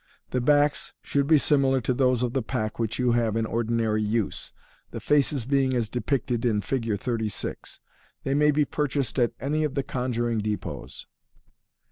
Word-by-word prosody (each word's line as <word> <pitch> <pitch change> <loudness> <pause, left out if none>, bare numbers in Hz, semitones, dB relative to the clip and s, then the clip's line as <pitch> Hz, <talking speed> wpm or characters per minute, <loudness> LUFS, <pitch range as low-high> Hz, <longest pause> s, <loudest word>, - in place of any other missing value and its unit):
The 125 - 0
backs 145 +2 +2
should 140 -1 0
be 155 0 +6
similar 135 -2 +3
to 125 - 0
those 125 -1 +2
of 120 -1 -1
the 135 - +1
pack 110 -2 -3
which 115 -1 -1
you 125 -1 +2
have 115 -2 +1
in 115 0 +1
ordinary 115 -1 0
use, 105 0 -1 0.4
the - - -6
faces 145 -3 +1
being 135 -1 +2
as 115 -3 0
depicted 125 -1 -1
in 110 -4 +2
Fig. 115 0 -1
36. 110 -2 -4 0.4
They 135 - 0
may 150 +1 +4
be 150 0 +3
purchased 140 -2 -1
at 120 -1 +2
any 150 +5 0
of 145 -2 -2
the 140 - 0
conjuring 120 -3 -1
depots. 105 0 -5
125 Hz, 170 wpm, -26 LUFS, 115-140 Hz, 0.4 s, be